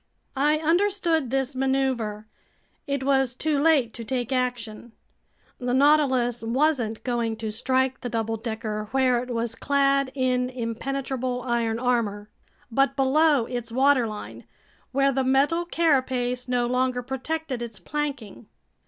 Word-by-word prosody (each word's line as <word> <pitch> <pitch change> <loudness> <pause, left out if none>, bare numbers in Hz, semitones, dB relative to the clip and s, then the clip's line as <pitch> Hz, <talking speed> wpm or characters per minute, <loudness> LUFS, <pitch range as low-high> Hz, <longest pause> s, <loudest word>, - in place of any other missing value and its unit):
I 295 +3 +3
understood 335 -3 +1
this 265 +1 -1
maneuver. 260 -5 -1 0.6
It 280 -1 -1
was 265 -2 +2
too 300 +1 0
late 285 -7 +3
to 230 - -7
take 245 +1 -3
action. 240 -3 -3 0.7
The 245 0 -1
Nautilus 260 -4 +3
wasn't 235 -2 0
going 235 -3 -1
to 220 -1 -4
strike 260 +3 0
the 245 - -4
double 225 -1 -1
decker 220 -1 -4
where 255 -2 +2
it 250 - -8
was 230 -1 -2
clad 275 0 +1
in 255 -1 +1
impenetrable 255 +1 -3
iron 235 -2 0
armor, 220 -4 -1 0.4
but 275 +2 +2
below 280 -1 +3
its 240 -1 -5
waterline, 250 -4 +1 0.5
where 275 +1 +3
the 265 0 0
metal 280 +6 +2
carapace 255 -7 +1
no 245 -1 +1
longer 250 0 0
protected 265 +1 -4
its 230 -3 -6
planking. 255 -1 -5
255 Hz, 130 wpm, -25 LUFS, 235-275 Hz, 0.7 s, I